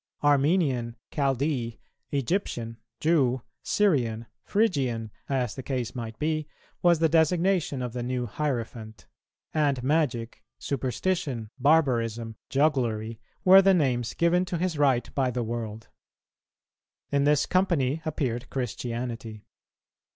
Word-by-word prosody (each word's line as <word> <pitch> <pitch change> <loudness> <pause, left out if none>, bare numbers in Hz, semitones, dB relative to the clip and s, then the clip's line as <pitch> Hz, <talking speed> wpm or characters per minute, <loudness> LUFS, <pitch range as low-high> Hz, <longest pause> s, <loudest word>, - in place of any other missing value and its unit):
Armenian, 140 -5 +2 0.2
Chaldee, 135 -4 0 0.3
Egyptian, 135 - -2 0.2
Jew, 135 -6 +2 0.2
Syrian, 120 - +1 0.2
Phrygian, 130 - 0 0.2
as 125 -5 0
the 130 - -6
case 125 -3 -3
might 115 -3 -6
be, 155 0 -1 0.3
was 175 -1 +5
the 160 +1 +3
designation 165 -2 +2
of 120 -2 -4
the 125 - -3
new 125 0 -2
hierophant; 115 -4 -4 0.5
and 145 -5 +1
magic, 125 -7 0 0.2
superstition, 135 - -2
barbarism, 120 -6 +2
jugglery, 120 -6 0 0.3
were 190 +1 +9
the 195 0 +5
names 125 -8 0
given 170 +2 +3
to 175 -1 -3
his 180 0 -1
rite 135 -4 +2
by 135 -2 +1
the 125 0 -2
world. 115 -1 -5 1.2
In 140 0 +2
this 150 0 +3
company 165 -6 +1
appeared 130 -6 -2
Christianity. 120 -3 -4
130 Hz, 115 wpm, -27 LUFS, 120-155 Hz, 1.2 s, were